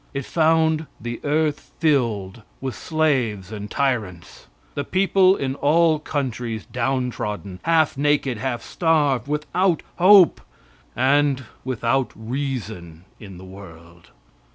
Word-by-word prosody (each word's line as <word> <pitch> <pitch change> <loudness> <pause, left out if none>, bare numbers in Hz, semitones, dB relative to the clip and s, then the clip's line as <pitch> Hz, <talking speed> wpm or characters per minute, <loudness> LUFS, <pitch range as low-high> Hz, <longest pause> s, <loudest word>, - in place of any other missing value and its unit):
It 140 -1 -3
found 160 -1 +2
the 120 0 -6
earth 150 0 -1
filled 115 - 0 0.2
with 130 -1 -4
slaves 125 -11 -1
and 105 -1 -6
tyrants, 105 - -3 0.3
the 145 - -3
people 190 +3 +3
in 135 -6 -2
all 155 +3 +3
countries 125 -7 -4
downtrodden, 115 -6 -3
half 165 -2 +2
naked, 145 -5 +1
half 120 -1 -3
starved, 145 -7 +1
without 160 +4 0
hope, 185 0 +6 0.5
and 135 +1 +2 0.2
without 130 +1 -1
reason 110 - -5
in 100 -4 -11
the 95 - -11
world. 85 -3 -14
130 Hz, 110 wpm, -22 LUFS, 110-155 Hz, 0.5 s, hope